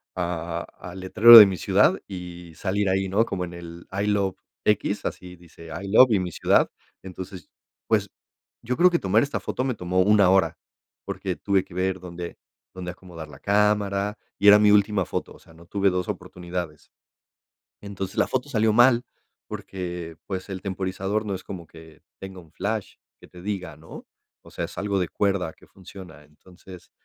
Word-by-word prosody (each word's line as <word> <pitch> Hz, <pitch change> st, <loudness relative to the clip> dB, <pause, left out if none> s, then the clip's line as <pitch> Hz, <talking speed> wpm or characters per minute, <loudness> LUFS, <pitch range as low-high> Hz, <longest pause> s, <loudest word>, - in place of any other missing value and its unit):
a 85 Hz, -1 st, -3 dB, 0.2 s
al 90 Hz, +1 st, -9 dB
letrero 115 Hz, +5 st, +9 dB
de 105 Hz, -, +11 dB
mi 95 Hz, -, -1 dB
ciudad -, -, +3 dB
y 90 Hz, -3 st, -9 dB
salir 100 Hz, +3 st, -1 dB
ahí, 95 Hz, 0 st, +1 dB
¿no? 110 Hz, +4 st, +2 dB
Como 90 Hz, -5 st, -3 dB
en 85 Hz, -, -10 dB
el 85 Hz, 0 st, -10 dB
I 100 Hz, +2 st, -2 dB
love 100 Hz, -2 st, +1 dB, 0.3 s
X, -, -, 0 dB
así 90 Hz, 0 st, -6 dB
dice 85 Hz, -1 st, -15 dB
I 100 Hz, -, -7 dB
love, 120 Hz, +4 st, +7 dB
y 100 Hz, -, +3 dB
mi 90 Hz, -2 st, -3 dB
ciudad. -, -, +2 dB, 0.3 s
Entonces, 95 Hz, 0 st, -9 dB, 0.4 s
pues -, -, +1 dB, 0.5 s
yo 125 Hz, +2 st, -2 dB
creo 180 Hz, +2 st, +6 dB
que 170 Hz, -1 st, 0 dB
tomar 105 Hz, +6 st, +2 dB
esta 140 Hz, -, -3 dB
foto 125 Hz, -, -3 dB
me 130 Hz, -2 st, -1 dB
tomó 90 Hz, -1 st, 0 dB
una 100 Hz, -1 st, +5 dB
hora, 95 Hz, 0 st, +3 dB, 0.5 s
porque -, -, -4 dB
tuve 100 Hz, -2 st, +1 dB
que 85 Hz, -, -17 dB
ver 95 Hz, 0 st, -1 dB
dónde, 85 Hz, -1 st, -8 dB, 0.4 s
dónde 90 Hz, -1 st, -6 dB
acomodar 90 Hz, -3 st, -11 dB
la 75 Hz, -, -13 dB
cámara 105 Hz, 0 st, +1 dB, 0.2 s
y 100 Hz, -, +3 dB
era 105 Hz, +1 st, +9 dB
mi 105 Hz, -1 st, +5 dB
última 100 Hz, -2 st, +3 dB
foto, -, -, -5 dB
o -, -, -17 dB
sea, -, -, -20 dB
no 85 Hz, +1 st, -17 dB
tuve 100 Hz, +1 st, +1 dB
dos 90 Hz, -1 st, -2 dB
oportunidades. 85 Hz, -3 st, -6 dB, 0.9 s
Entonces 95 Hz, -2 st, -6 dB
la -, -, +3 dB
foto 130 Hz, +2 st, -2 dB
salió 110 Hz, -4 st, +2 dB
mal 120 Hz, +1 st, +5 dB, 0.4 s
porque, 85 Hz, -3 st, -6 dB
pues, 95 Hz, 0 st, -5 dB
el 95 Hz, -1 st, -5 dB
temporizador 95 Hz, +2 st, -3 dB
no 100 Hz, -, -3 dB
es 95 Hz, -, -9 dB
como 90 Hz, -3 st, -8 dB
que 80 Hz, -1 st, -16 dB, 0.2 s
tenga 95 Hz, -1 st, -9 dB
un 80 Hz, -3 st, -21 dB
flash 105 Hz, +4 st, -4 dB, 0.2 s
que -, -, -16 dB
te 90 Hz, -, -14 dB
diga, 95 Hz, -5 st, -5 dB
¿no? 80 Hz, +1 st, -12 dB, 0.4 s
O -, -, -15 dB
sea, -, -, -3 dB
es -, -, -12 dB
algo 100 Hz, -1 st, -1 dB
de 90 Hz, -, 0 dB
cuerda 95 Hz, -5 st, -1 dB
que -, -, -21 dB
funciona. 90 Hz, -5 st, -13 dB
Entonces, 90 Hz, +4 st, -16 dB
95 Hz, 185 wpm, -24 LUFS, 90-100 Hz, 0.9 s, de